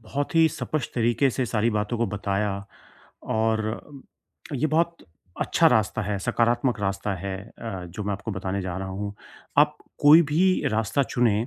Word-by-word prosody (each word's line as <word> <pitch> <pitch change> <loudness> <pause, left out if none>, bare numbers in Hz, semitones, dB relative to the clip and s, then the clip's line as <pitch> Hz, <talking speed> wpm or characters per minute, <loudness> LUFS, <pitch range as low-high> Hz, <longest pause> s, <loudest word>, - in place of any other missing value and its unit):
बहुत 140 +8 -4
ही 165 0 +6
स्पष्ट 155 -3 -4
तरीक़े 120 +3 +2
से 130 +1 -1
सारी 115 0 +1
बातों 105 +2 -1
को 120 - +1
बताया 100 0 -2 0.6
और 110 +2 -1 0.6
ये 140 +3 +1
बहुत 165 +2 +1 0.4
अच्छा 165 - +3
रास्ता 110 -2 +1
है, 100 0 -2
सकारात्मक 120 +4 +1
रास्ता 100 0 -1
है 95 +1 -4 0.2
अ, 95 -6 -5
जो 90 +5 -7
मैं 100 - -1
आपको 105 +3 -5
बताने 95 0 -3
जा 90 -1 -4
रहा 95 0 -4
हूँ, 100 +2 -4 0.4
आप 150 0 +5 0.3
कोई 150 +3 +9
भी 185 +5 +3
रास्ता 110 +5 +1
चुनें, 115 -4 +1
110 Hz, 160 wpm, -25 LUFS, 100-135 Hz, 0.6 s, कोई